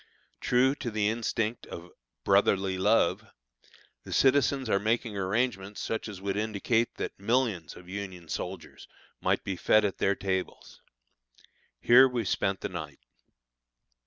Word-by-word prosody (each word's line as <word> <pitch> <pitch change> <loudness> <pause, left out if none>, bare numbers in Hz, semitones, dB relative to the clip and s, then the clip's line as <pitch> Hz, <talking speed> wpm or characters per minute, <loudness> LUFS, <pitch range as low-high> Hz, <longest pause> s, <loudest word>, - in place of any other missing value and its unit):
True 130 +2 +3
to 120 - -4
the 105 -1 0
instinct 115 0 -2
of 85 +1 -9 0.3
"Brotherly 95 -1 +2
Love," 95 -1 +2 0.8
the - - -10
citizens 135 -1 +3
are 100 -2 +2
making 110 +1 -1
arrangements 100 0 -1
such 110 - -3
as 100 -3 -8
would 100 0 -3
indicate 110 +2 0
that - - -5
millions 110 - 0
of 90 - -14
Union 95 -3 -7
soldiers - - -6 0.3
might - - +1
be 95 - -3
fed 110 +4 +3
at 100 - -3
their 100 - +2
tables. 95 -1 -4 1.0
Here 130 +2 +7
we 120 -3 -2
spent 95 0 -1
the - - -3
night. 80 -6 -7
105 Hz, 135 wpm, -28 LUFS, 95-115 Hz, 1.0 s, Here